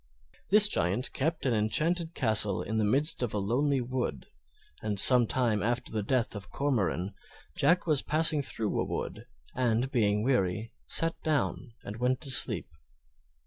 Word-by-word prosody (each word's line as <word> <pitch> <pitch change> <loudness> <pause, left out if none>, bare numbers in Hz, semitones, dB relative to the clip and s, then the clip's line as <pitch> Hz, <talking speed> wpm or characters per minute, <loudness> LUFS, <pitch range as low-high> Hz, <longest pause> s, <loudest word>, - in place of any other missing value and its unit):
This 210 +1 +9
Giant 100 - -1
kept 155 +3 -2
an 130 - +1
enchanted 160 +10 -1
castle 110 -5 0
in 110 +1 -3
the - - 0
midst 135 +10 +2
of 120 -4 -3
a - - -1
lonely 130 +7 0
wood, 120 - -4 0.6
and 105 -2 -3
some 125 0 +7
time 115 -5 0
after 120 +2 -2
the 110 - -2
death 120 +1 -1
of 100 0 -9
Cormoran, 105 -9 -2 0.4
Jack 175 +6 +1
was 155 -5 +1
passing 155 -1 +1
through 110 -5 -3
a - - 0
wood, - - -6 0.3
and, 125 +1 -1
being 105 -4 0
weary, 110 -4 -1
sat 165 0 +1
down 140 -5 -2
and 105 +2 -8
went 125 +2 -1
to 140 -3 -2
sleep. - - +3
125 Hz, 160 wpm, -28 LUFS, 105-140 Hz, 0.6 s, This